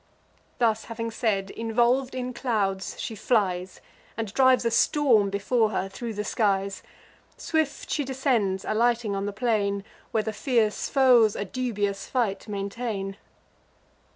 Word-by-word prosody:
Thus 225 -3 +1
having 230 0 -4
said, 200 -4 -1
involv'd 240 +4 +1
in 255 0 -3
clouds, 205 -6 -1
she - - -4
flies, 190 -5 0 0.4
And 220 -3 -4
drives 260 -1 +4
a 230 - +2
storm 230 -5 +3
before 215 +3 +1
her 195 -2 -2
thro' 230 +4 -5
the 210 -1 -3
skies. 200 -2 0 0.6
Swift 315 -3 -1
she 295 - 0
descends, 250 -8 0
alighting 230 -1 +1
on 195 +1 -2
the - - -2
plain, 200 -2 0 0.3
Where 220 -2 0
the 220 - -3
fierce 225 -3 0
foes 245 -6 +5
a 200 - -3
dubious 205 -4 -2
fight 230 -6 -1
maintain. 200 -1 -4
220 Hz, 135 wpm, -26 LUFS, 200-245 Hz, 0.6 s, foes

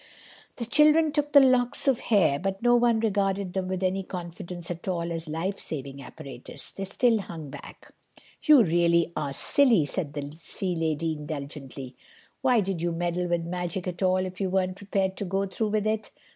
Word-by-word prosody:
The 235 - -4
children 300 +5 +5
took 295 -1 -1
the 285 - +9
locks 255 -1 +3
of 265 -3 +3
hair, 185 -10 +2
but 195 +4 -3
no 240 0 +5
one 235 -2 +3
regarded 195 -3 0
them 190 -1 -2
with 185 0 -3
any 190 +1 +1
confidence 175 -1 -7
at 175 +1 -7
all 170 -2 -1
as 165 0 -4
lifesaving 155 -5 -4
apparatus. 135 -4 -6
They 195 - -5
still 225 +3 +2
hung 160 -7 -7
back. - - -12 0.5
"You 300 -6 +7
really 170 -1 +2
are 145 -2 -2
silly," 230 - +4
said 150 -1 -3
the 145 0 -6
sea 180 +2 -3
lady 160 0 -1
indulgently. 140 -3 -7 0.5
"Why 250 -4 +4
did 190 -3 -3
you 175 0 0
meddle 175 +1 -1
with 170 -1 0
magic 180 +1 -3
at 180 0 -5
all 185 -1 +3
if 185 +1 -7
you 190 - 0
weren't 185 0 0
prepared 195 -1 -1
to 200 - -3
go 195 +2 0
through 205 +3 -2
with 210 0 0
it? 215 0 -1
185 Hz, 185 wpm, -27 LUFS, 165-210 Hz, 0.5 s, the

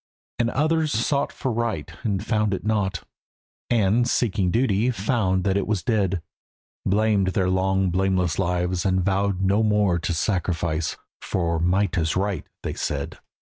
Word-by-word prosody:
And 120 -1 +2
others 155 +3 +1
sought 140 +6 0
for 130 - -3
right 110 -9 -2
and 105 -3 -2
found 105 -3 +1
it - - -8
not, 100 -5 0 0.7
And, 115 +1 +3
seeking 100 -5 +1
duty, 115 +1 +2
found 100 -4 0
that 95 0 +1
it 100 - -1
was 105 -4 -1
dead, 100 -8 0 0.6
Blamed 105 -1 +2
their 95 -1 +2
long 95 0 +1
blameless 95 -2 +1
lives 90 -1 0
and 95 -2 +1
vowed 100 -1 0
no 100 +3 +3
more 105 -5 +2
To 80 - -2
sacrifice, 85 -3 -1 0.2
for 85 -2 -1
"Might 90 +2 +1
is 80 -1 0
right" 100 0 -1 0.2
they - - -3
said. - - -4
95 Hz, 150 wpm, -24 LUFS, 90-110 Hz, 0.7 s, And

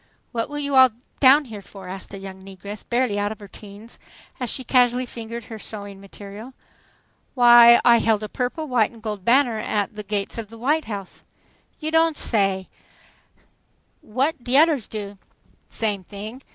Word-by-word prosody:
"What 230 0 -3
you 280 0 -2
all 260 -1 +8 0.3
down 280 +2 +6
here 215 -5 -9
for?" 195 0 -12
asked 190 +1 -8
a 200 - -7
young 190 -1 -10
negress, 195 +2 -9
barely 240 -4 0
out 205 0 -1
of 220 - -8
her 205 - -11
teens, 205 +3 -13 0.4
as 250 -2 -3
she 260 - -4
casually 250 0 +2
fingered 235 -1 -8
her 220 -1 -9
sewing 200 -2 -8
material. 205 +5 -11 0.8
"Why, 240 -1 +8
I 240 -1 +7
held 220 -2 +1
a - - -3
purple, 255 +8 -3
white 245 -5 +2
and 230 -2 -17
gold 210 -4 -5
banner 240 0 +3
at 210 -1 -2
the 210 - -5
gates 205 +1 -3
of 225 - -6
the 230 - -12
White 295 +7 0
House." 200 -4 -7 0.6
"You 310 0 -3
don' 325 -1 +3
say 195 -7 0
so! - - -32 0.6
What 260 +4 -2
de 250 +2 0
odders 300 -7 +3
do?" 205 -2 -7 0.5
"Same 210 -4 -2
thing. 215 +7 -9
225 Hz, 175 wpm, -22 LUFS, 205-250 Hz, 0.8 s, all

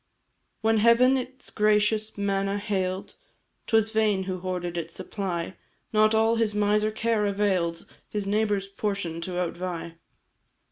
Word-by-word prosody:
"When 225 0 +3
Heaven 235 +4 +5
its 260 0 -5
gracious 215 0 +2
manna 195 0 0
hail'd, 190 -2 -2 0.5
'Twas 220 -1 +3
vain 215 -3 +2
who 185 -1 -4
hoarded 180 -1 -3
its 165 -1 -4
supply, 185 -2 -4 0.4
Not 215 +1 +4
all 225 +1 +3
his 220 -2 +1
miser 210 +1 +2
care 215 -1 0
avail'd 190 -5 0 0.2
His 205 -2 -2
neighbour's 205 -1 0
portion 195 -5 -3
to 180 +1 -4
outvie. 170 -1 -4
205 Hz, 130 wpm, -26 LUFS, 185-215 Hz, 0.5 s, Heaven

